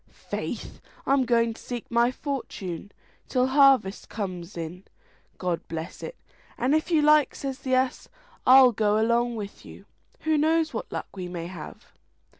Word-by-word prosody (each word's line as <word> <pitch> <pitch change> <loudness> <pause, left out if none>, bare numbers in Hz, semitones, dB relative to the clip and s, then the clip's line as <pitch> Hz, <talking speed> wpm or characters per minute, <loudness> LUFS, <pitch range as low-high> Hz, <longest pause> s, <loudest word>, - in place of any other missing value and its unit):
"Faith, - - -4 0.2
I'm 275 -1 +3
going 230 -1 +2
to - - -14
seek 245 -2 -5
my 235 +1 +4
fortune 205 - -5 0.4
till 255 -1 +2
harvest 265 -7 +4
comes 185 -4 -5
in, 170 +3 -6 0.5
God 180 -2 -1
bless 165 0 -6
it!" - - -6 0.4
"And 255 +4 +1
if 315 +2 +1
you 320 -3 +3
like," 300 -1 +5
says 270 -1 -5
the 260 -2 0
ass, 255 0 0 0.4
"I'll 255 0 +9
go 210 -1 +1
along 235 +2 +2
with 205 -2 -7
you; - - -13 0.4
who 315 -1 +2
knows 320 +1 +2
what - - -5
luck - - -6
we 185 -2 -5
may 175 -2 -5
have!" 175 -3 -10
240 Hz, 160 wpm, -26 LUFS, 190-275 Hz, 0.5 s, I'll